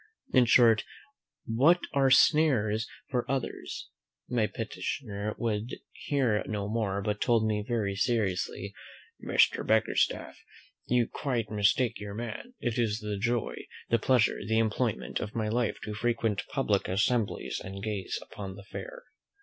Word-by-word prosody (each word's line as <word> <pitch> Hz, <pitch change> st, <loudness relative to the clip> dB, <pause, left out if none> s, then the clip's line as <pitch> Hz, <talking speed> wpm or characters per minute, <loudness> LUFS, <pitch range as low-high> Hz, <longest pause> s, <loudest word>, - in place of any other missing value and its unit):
In 130 Hz, -2 st, +6 dB
short, 115 Hz, -2 st, +5 dB, 0.6 s
what 140 Hz, +10 st, +4 dB
are 135 Hz, -2 st, +4 dB
snares 120 Hz, -8 st, +4 dB, 0.2 s
for 125 Hz, -2 st, +1 dB
others 135 Hz, -2 st, -3 dB, 0.2 s
" -, -, -63 dB
My 115 Hz, -4 st, +1 dB
petitioner 110 Hz, -2 st, -4 dB
would 115 Hz, +1 st, -2 dB, 0.2 s
hear 125 Hz, -7 st, 0 dB
no 105 Hz, -2 st, -2 dB
more, 100 Hz, -3 st, -1 dB
but 105 Hz, -1 st, -2 dB
told 115 Hz, -2 st, +3 dB
me 105 Hz, -1 st, 0 dB
very 105 Hz, -5 st, 0 dB
seriously, 100 Hz, -3 st, -1 dB, 0.5 s
"Mr. -, -, +3 dB
Bickerstaff, 110 Hz, 0 st, +1 dB, 0.5 s
you 120 Hz, -1 st, +3 dB
quite 120 Hz, -7 st, -2 dB
mistake 105 Hz, +3 st, +2 dB
your 100 Hz, -1 st, -6 dB
man; 120 Hz, -, -6 dB
it 120 Hz, -1 st, -1 dB
is 110 Hz, -3 st, +1 dB
the 105 Hz, -1 st, -3 dB
joy, 115 Hz, +2 st, 0 dB, 0.4 s
the 115 Hz, -, +4 dB
pleasure, 125 Hz, 0 st, +3 dB
the 110 Hz, +2 st, 0 dB
employment, 110 Hz, -, 0 dB
of 105 Hz, -, -5 dB
my 110 Hz, -2 st, 0 dB
life 120 Hz, 0 st, 0 dB
to 105 Hz, -, -4 dB
frequent 115 Hz, -2 st, 0 dB
public 105 Hz, -8 st, +1 dB
assemblies, 110 Hz, +4 st, 0 dB
and 100 Hz, +1 st, -7 dB
gaze 105 Hz, -4 st, -2 dB
upon 95 Hz, -2 st, -8 dB
the 100 Hz, -, -11 dB
fair." -, -, -8 dB
110 Hz, 140 wpm, -29 LUFS, 105-120 Hz, 0.6 s, In